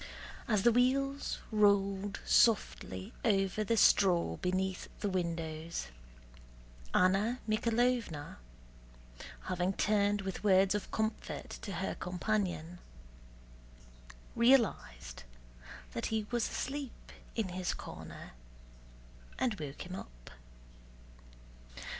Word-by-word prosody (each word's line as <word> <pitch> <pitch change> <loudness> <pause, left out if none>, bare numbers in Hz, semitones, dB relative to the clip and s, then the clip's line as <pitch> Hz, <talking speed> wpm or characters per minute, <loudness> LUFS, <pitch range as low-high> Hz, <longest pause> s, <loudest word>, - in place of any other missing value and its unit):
As 215 -5 +2
the 240 - +6
wheels 275 +3 +1
rolled 200 -1 +2
softly 140 - +2
over 200 -1 +2
the 230 +2 +1
straw 175 - +4
beneath 185 0 -1
the 205 - -1
windows, 165 - -3 1.0
Anna 195 +6 +3
Mikháylovna, 230 -7 0 1.0
having 185 +1 -1
turned 205 0 +2
with 190 +1 -5
words 195 -1 +5
of 205 - -3
comfort 220 0 -3
to 200 - -5
her 190 +2 -2
companion, 180 -2 -2 1.6
realized 230 - +2 0.7
that - - -2
he 220 -1 -1
was 240 -2 0
asleep 275 -1 -5 0.2
in 220 -5 -1
his 180 0 -2
corner - - -9 1.1
and 250 -3 +1
woke 145 +2 -6
him 180 - -8
up. - - -11
195 Hz, 95 wpm, -33 LUFS, 180-225 Hz, 1.6 s, the